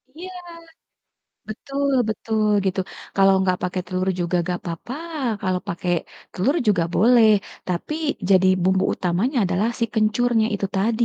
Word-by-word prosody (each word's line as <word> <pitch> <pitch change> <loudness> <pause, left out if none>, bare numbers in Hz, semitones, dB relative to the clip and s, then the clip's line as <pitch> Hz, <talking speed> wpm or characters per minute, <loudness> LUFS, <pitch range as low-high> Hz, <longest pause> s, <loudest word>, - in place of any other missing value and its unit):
Iya. 370 +3 -8 1.2
Betul 275 +5 -3 0.2
betul 215 0 -1 0.2
gitu. 190 0 0 0.4
Kalau 195 0 +5
enggak 185 -1 +1
pakai 180 0 -2
telur 185 0 -2
juga 175 +1 0
enggak 175 0 -3
papa, 170 +9 -5 0.5
kalau 185 -2 0
pake 175 +1 -4 0.4
telur 265 - +1
juga 175 -5 +3
boleh, 230 +2 +5 0.4
tapi 180 - -3 0.4
jadi 190 -1 +5 0.2
bumbu 190 +1 +2
utamanya 190 - -1
adalah 185 +5 0
si 230 - +2
kencurnya 220 +1 +2
itu 200 0 -1
tadi. 225 +4 +1
195 Hz, 135 wpm, -22 LUFS, 185-230 Hz, 1.2 s, Kalau